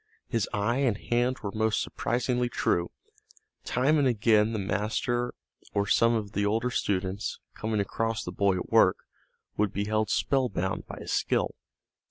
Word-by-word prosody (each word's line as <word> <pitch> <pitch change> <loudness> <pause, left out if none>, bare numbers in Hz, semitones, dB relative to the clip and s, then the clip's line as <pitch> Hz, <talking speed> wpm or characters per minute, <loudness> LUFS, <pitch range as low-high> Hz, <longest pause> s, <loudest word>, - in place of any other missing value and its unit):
His 115 -3 -1
eye 105 +4 0
and 130 -7 +1
hand 120 +3 0
were 100 - -3
most 110 +1 +1
surprisingly 125 0 -1
true. 85 -6 0 0.7
Time 140 +5 +2
and 140 - +3
again 110 -2 +3
the 110 - -2
master 110 +5 -1 0.4
or 100 0 +2
some 115 +3 +4
of 105 -3 -3
the 105 - -1
older 115 +4 +1
students, 95 -2 -1 0.2
coming 110 -1 -2
across 115 +2 -1
the 90 - -5
boy 100 +1 +2
at 90 - -5
work, - - +5 0.6
would 105 -2 +1
be 100 +1 -2
held 110 0 0
spellbound 105 -11 0
by - - -8
his - - -4
skill. - - +1
110 Hz, 160 wpm, -28 LUFS, 100-120 Hz, 0.7 s, work